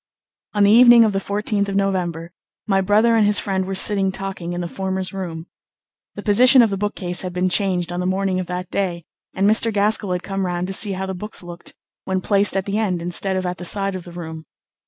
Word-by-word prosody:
On 205 - +3
the 200 - +5
evening 240 0 +8
of 215 -2 +1
the 195 - 0
14th 200 0 -2
of 195 - -3
November 175 -4 -2 0.3
my 195 -3 +1
brother 215 +4 +3
and 225 - +4
his 205 0 +4
friend 190 -2 -1
were 195 - -3
sitting 195 -1 +2
talking 190 -3 -5
in 175 - -4
the 175 - -4
former's 190 +1 -3
room. 170 -4 -6 0.7
The - - -7
position 250 +5 +6
of 220 - +1
the 195 - -2
bookcase 190 -3 -2
had 185 -1 -6
been 180 +1 0
changed 180 -2 0
on 175 - -4
the 180 - -2
morning 190 0 -1
of 185 - -4
that 180 0 -5
day, 175 -4 -2 0.3
and 195 +1 +2
Mr. 220 +2 +3
Gaskell 205 -2 +1
had 180 - -3
come 195 -1 -3
round 175 0 -2
to 195 - -5
see 200 0 +1
how 190 0 -4
the 190 - -4
books 210 +1 -5
looked 175 0 -10 0.3
when 190 0 -1
placed 200 +1 +1
at 190 - -2
the 205 +1 -2
end 190 -5 -1
instead 175 +3 -1
of 185 0 -2
at 180 0 -4
the - - -7
side 195 +2 0
of 185 - -6
the 175 - -10
room. 160 -2 -8
190 Hz, 240 wpm, -20 LUFS, 180-205 Hz, 0.7 s, evening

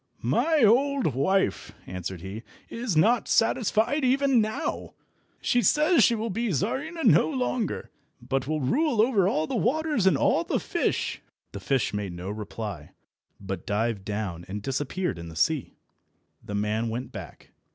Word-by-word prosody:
"My 255 - +2
old 255 - +3
wife," 190 +10 0
answered 90 -1 -6
he, 95 +4 -7 0.3
"is 230 -7 -2
not 230 +9 +3
satisfied 230 +4 +2
even 265 -1 +3
now. 215 0 -3 0.5
She 245 - +2
says 300 0 +4
she 235 - +4
will 225 0 -3
be 230 +4 -1
Czarina 275 - -2
no - - +5
longer, 250 -5 -2 0.3
but 130 +2 -2
will 155 0 -1
rule 270 - +1
over 215 -5 +4
all 155 -5 +1
the - - -5
waters 295 -4 +1
and 190 - +4
all - - +2
the - - -1
fish." - - -1 0.3
The 100 - -7
fish 130 +4 0
made 100 -3 -3
no 90 +3 -5
reply, 105 -6 -6 0.5
but 95 -3 -6
dived 105 0 -1
down 100 -5 -4
and 100 +2 -6
disappeared 140 - -2
in 85 0 -8
the 80 - -11
sea. 140 - 0 0.7
The 105 - -5
man 105 +3 -1
went 120 +3 -5
back. 95 -6 -10
155 Hz, 155 wpm, -26 LUFS, -, 0.7 s, no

